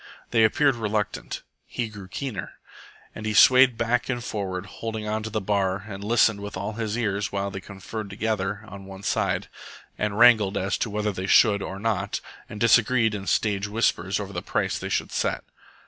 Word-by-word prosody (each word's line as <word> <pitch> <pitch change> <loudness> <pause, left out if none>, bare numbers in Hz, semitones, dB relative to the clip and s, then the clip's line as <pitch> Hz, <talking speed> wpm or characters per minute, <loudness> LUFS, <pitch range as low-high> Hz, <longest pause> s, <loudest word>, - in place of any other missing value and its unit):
They 115 -2 +4
appeared 140 +5 +3
reluctant. 105 -2 -2 0.2
He 120 - -3
grew 105 -3 -10
keener. 105 -2 -5 0.6
And 110 - -8
he 105 - -1
swayed 130 0 +7
back 115 +3 0
and 120 -2 -2
forward, 95 -5 -3
holding 110 +1 -5
on 110 +1 -1
to 110 - -5
the 110 0 -1
bar 95 -1 0
and 100 -2 -7
listened 110 -1 +3
with 100 -1 -6
all 100 +3 -3
his 110 0 -3
ears 105 -4 -1
while 100 0 -2
they 95 - -6
conferred 100 +2 -7
together 105 0 -2
on 95 -1 -10
one 95 0 -10
side, - - 0 0.5
and 105 -1 -1
wrangled 110 -4 +6
as 95 +2 0
to 120 - -1
whether 105 0 -1
they 95 -1 -4
should 100 -2 +5
or 95 - -5
not, 100 -2 -1 0.3
and 105 - -8
disagreed 115 0 +4
in 100 -2 -5
stage 100 -2 +1
whispers 100 -3 0
over 100 -1 -6
the - - -3
price - - -1
they - - -5
should - - -1
set. - - -1
105 Hz, 190 wpm, -25 LUFS, 100-115 Hz, 0.6 s, swayed